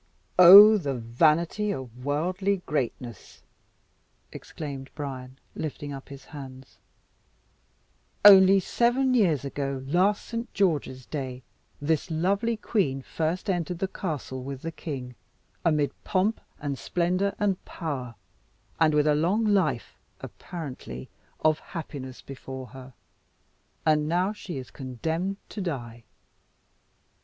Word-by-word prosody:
"Oh, 205 +4 +11
the 140 -6 -2
vanity 155 - +1
of 125 - -7
worldly 180 +7 -1
greatness!" 120 - -4 0.9
exclaimed 140 -3 -7
Bryan, 130 -3 -6 0.2
lifting 145 -2 -5
up 135 +1 -9
his 140 -1 -11
hands. 135 -3 -11 1.5
"Only 195 -1 +9
seven 245 +6 +1
years 170 - +2
ago, 135 -1 -3
last 185 +8 +2
Saint 230 +1 -5
George's 150 - 0
Day, 130 -2 -5 0.4
this 155 +4 0
lovely 200 +8 0
queen 140 - -1
first 165 +8 -2
entered 175 -2 -1
the 190 - -1
castle 150 -9 -5
with 135 0 -7
the 165 - -3
king, 135 -7 -6 0.5
amid 150 -4 +2
pomp 205 +3 0 0.2
and 140 -2 -4
splendour 185 +3 0
and 200 -3 0
power, 135 -8 -5 0.6
and 155 -2 +4
with 150 0 +3
a 150 - +4
long 180 +9 +1
life 190 - 0 0.2
apparently 130 - -8 0.3
of 155 0 +3
happiness 140 -6 -8
before 130 -1 -8
her. 130 -1 -12 0.9
And 150 -1 +3
now 180 +5 +1
she 190 -7 -7
is 130 -1 -8
condemned 160 +9 -3
to 210 - -6
die." 120 -9 -5
155 Hz, 115 wpm, -26 LUFS, 135-185 Hz, 1.5 s, Oh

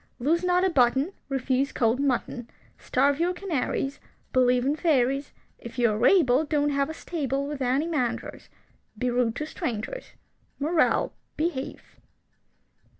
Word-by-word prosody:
Lose 325 +8 +1
not 360 0 +3
a 380 - +3
button. 265 +5 +2 0.2
Refuse 270 0 0
cold 230 +2 +1
mutton. 250 -3 -1 0.3
Starve 280 +3 +1
your 350 +2 +1
canaries. 300 -6 -2 0.3
Believe 250 -1 +3
in 285 +2 +2
fairies. 275 -4 +1 0.3
If 235 - -10
you 235 -2 +3
are 215 +3 0
able, 300 -7 +4
Don't 295 -1 +1
have 280 +1 0
a - - -4
stable 280 -6 -2
With 290 -2 -5
any 260 +4 +1
mangers. 280 -8 -3 0.5
Be 250 +2 0
rude 240 -2 +1
to 300 - -3
strangers. 260 - -5 0.4
Moral: 315 +3 +1 0.2
Behave. 305 -4 -3
275 Hz, 140 wpm, -26 LUFS, 250-310 Hz, 0.5 s, able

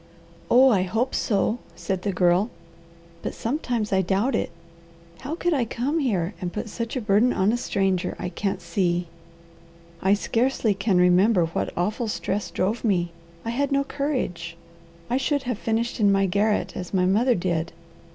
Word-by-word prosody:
"Oh 260 +2 +7
I 195 -5 +3
hope 220 +8 -1
so!" 215 +2 +1 0.2
said 180 +2 -3
the 200 - -1
Girl. 180 +3 +3 0.7
"But - - -4
sometimes 235 -5 -2
I 190 - +4
doubt 195 +8 +1
it. - - 0 0.7
How 280 +4 -5
I - - -1
could 300 -10 0
come 275 +8 -1
here 200 - 0
and 180 -1 -3
put 215 +3 -5
such 230 +3 -4
a 255 - -1
burden 215 +3 +3
on 190 +3 +2
a - - +1
stranger, 195 -6 0
I 180 - -4
can't 195 +2 -2
see. 175 0 0 1.0
I 195 +2 +4
scarcely 230 +1 +1
can 195 -1 +1
remember 180 +1 +4
what 165 - -2
awful 210 +6 -1
stress 210 -1 -2
drove 205 +6 -1
me. 175 -6 +1 0.3
I 230 - -1
had 280 +4 0
no 275 0 +2
courage. 250 - -3 0.5
I 250 - +1
should 285 +1 0
have 245 -4 -3
finished 230 +2 -1
in 205 -2 +4
my 195 0 +3
garret 205 +3 +1
as 180 +2 -5
my 180 -1 +3
mother 230 +7 +3
did. 170 -2 -1
210 Hz, 170 wpm, -24 LUFS, 185-240 Hz, 1.0 s, Oh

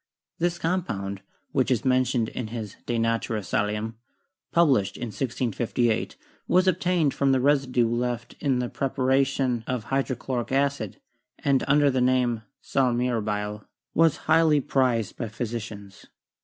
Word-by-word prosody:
This 175 +1 0
compound, 105 - -2 0.3
which - - +1
is 125 -2 +1
men 130 0 +4
tioned 115 -3 0
in 125 - -5
his 110 -3 -6
'De 120 - 0
Natura 115 -1 0
Salium,' 105 +3 -1 0.6
published 140 - +3
in 120 - -4
1658, 120 -1 -1 0.3
was 185 +1 +3
obtained 180 -4 +2
from 140 -1 +2
the 130 - +3
residue 130 -3 +2
left 120 0 -2
in 135 -4 +1
the 125 0 -1
preparation 135 -2 +1
of 125 -4 -2
hy 135 +4 +1
drochloric 125 -2 -3
acid, 140 -6 0 0.4
and, 140 -2 +1
under 145 0 +4
the 130 -1 +1
name 125 -2 +2 0.2
"sal 130 -2 +2
mirabile," 105 -4 -1 0.3
was 165 -2 +4
prized - - -18
highly 160 -1 +4
by 130 -5 0
physicians. 110 -3 -6
125 Hz, 140 wpm, -26 LUFS, 115-140 Hz, 0.6 s, men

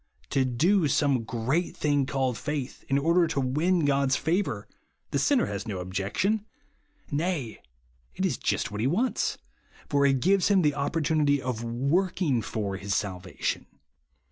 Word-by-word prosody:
To 135 - +3
do 155 +8 +2
some 140 -5 +2
great 130 +10 -1
thing 145 -3 +1
called 130 -3 0
faith, 140 +2 -4
in 135 - +3
order 170 +4 +3
to 140 - -1
win 155 +6 +1
God's 140 -2 +2
favour, 165 +8 -1 0.4
the - - +1
sinner 275 -4 +3
has 100 +1 -5
no 100 -3 -3
objection; 100 - -1 0.7
nay, 150 -6 -2 0.5
it - - -1
is - - -1
just - - -1
what 105 +1 -3
he 120 - +2
wants, 225 - 0 0.5
for 140 -1 +2
it 135 -1 +2
gives 190 +6 +3
him 195 -3 +4
the 150 -1 +3
opportunity 150 0 +1
of 125 -3 -3
W07^k 140 +11 0
m^ 145 -10 +1
/or 100 -3 -3
his 100 0 -2
salvation. 95 -3 -3
140 Hz, 155 wpm, -27 LUFS, 120-165 Hz, 0.7 s, him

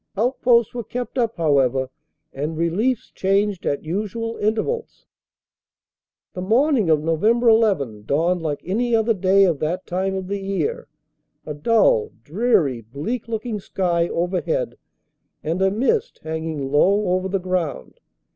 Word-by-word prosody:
Outposts 235 0 +2
were 240 -1 -4
kept 250 +4 -5
up, 230 -2 0
however, 135 -5 +2 0.4
and 150 +3 -4
reliefs 205 +9 0
changed 195 0 0
at 140 - -1
usual 215 +7 -3
intervals. 225 - -2 1.3
"The 180 - -5
morning 230 - +2
of 155 -1 +3
Nov. 160 -1 -1
1 230 +3 +4
1 200 - +2
dawned 170 +5 +1
like 150 -3 -3
any 230 +6 +1
other 225 +1 +2
day 195 0 +3
of 170 -7 +2
that 175 +4 -2
time 190 +2 -2
of 190 -1 -4
the 200 +1 -3
year, 435 - -2 0.6
a 150 - -4
dull, 150 - +3
dreary, 155 - +1
bleak 150 - -5
looking 225 -1 -3
sky 175 -3 0
over 175 +2 -1
head - - -2 0.7
and 165 +4 -2
a 190 - +4
mist 265 - 0
hanging 160 -3 -4
low 195 +7 +3
over 185 +1 0
the 195 +1 0
ground. 175 - -3
190 Hz, 145 wpm, -22 LUFS, 160-225 Hz, 1.3 s, 1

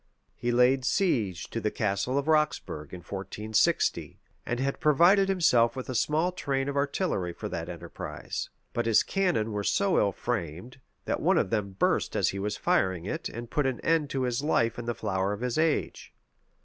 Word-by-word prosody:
He 120 - -2
laid 125 +2 +4
siege 120 - 0
to 115 - -2
the 105 - +1
Castle 105 +5 -1
of 140 +1 -1
Roxburgh 150 - 0
in 90 - -8
1460, 100 +4 -1 0.3
and 120 - -1
had 135 +1 -1
provided 175 +6 +5
himself 125 -11 +3
with 130 -1 -6
a - - -2
small 155 +8 +1
train 135 -6 -2
of 140 - -3
artillery 140 - -1
for - - -6
that 85 +1 -4
enterprise: 85 -1 -6 0.2
but 120 -1 -1
his 115 - +5
cannon 175 - 0
were 105 -1 -2
so 195 - +2
ill 100 - +2
framed, 100 - -4 0.3
that - - -1
one - - +3
of 95 - +1
them 100 -3 -1
burst - - +1
as - - +2
he 100 - -4
was 105 +1 -2
firing 95 -3 +1
it, - - -3
and 120 0 -8
put 150 -2 +1
an 130 -2 -2
end 165 -3 +1
to 135 -2 -1
his 125 0 -1
life 115 -6 +1
in 120 - -6
the 120 -1 -2
flower 95 -1 -1
of 105 - -6
his 125 +3 -1
age. 160 -2 0
120 Hz, 190 wpm, -28 LUFS, 100-145 Hz, 0.3 s, provided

